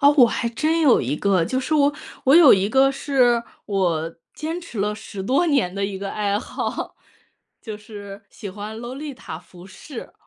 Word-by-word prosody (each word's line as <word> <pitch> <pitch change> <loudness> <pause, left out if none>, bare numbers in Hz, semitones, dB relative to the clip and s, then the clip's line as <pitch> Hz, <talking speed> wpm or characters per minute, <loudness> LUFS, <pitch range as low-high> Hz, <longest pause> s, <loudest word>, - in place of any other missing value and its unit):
哦， 285 0 +7
我 250 - +9
还 235 0 -1
真 310 +8 0
有 285 -6 +5
一 135 +4 -2
个， 190 -3 +2
就 260 +9 -1
是 310 +4 -1
我 285 -1 +3 0.3
我 270 +4 +6
有 330 -6 +9
一 195 +1 +3
个 270 +4 +4
是 255 -4 +2 0.2
我 170 -5 -1 0.2
坚 325 +3 -4
持 330 -10 -9
了 210 +1 0
10 205 -2 -8
多 270 - +2
年 270 - +1
的 200 0 -1
一 195 -1 -4
个 195 0 -4
爱 205 -1 0
好， - - -4 0.6
就 215 -2 -7
是 205 -1 -10
喜 205 -4 -8
欢 210 +3 -7
洛丽塔 255 - -7
服 175 +1 -15
饰。 235 +6 -10
220 Hz, 205 characters per minute, -22 LUFS, 195-275 Hz, 0.6 s, 我